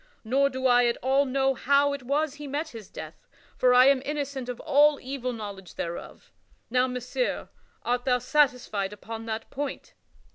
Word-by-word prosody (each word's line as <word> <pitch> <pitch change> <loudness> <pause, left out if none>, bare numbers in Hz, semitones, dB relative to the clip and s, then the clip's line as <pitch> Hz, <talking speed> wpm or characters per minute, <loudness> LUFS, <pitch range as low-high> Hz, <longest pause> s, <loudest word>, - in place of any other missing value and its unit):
Nor 270 +5 +2
do 260 0 -5
I 245 -1 +5
at 235 - 0
all 270 +2 +3
know 270 0 +1
how 280 +2 +3
it 280 - -5
was 285 +3 0
he 290 0 -8
met 295 +3 -3
his 225 -7 -10
death, - - -10 0.3
for 250 - +3
I 250 +1 +7
am 275 -1 +5
innocent 280 -3 -4
of 245 - -5
all 295 -1 +4
evil 255 -1 -4
knowledge 205 -5 -8
thereof. 170 0 -6 0.4
Now, 250 +1 +3
Messire, 250 - -3 0.3
art 245 0 -1
thou 250 -2 +3
satisfied 250 -7 +1
upon 225 +2 -8
that 220 0 -5
point?" 285 0 -5
260 Hz, 175 wpm, -27 LUFS, 240-280 Hz, 0.4 s, I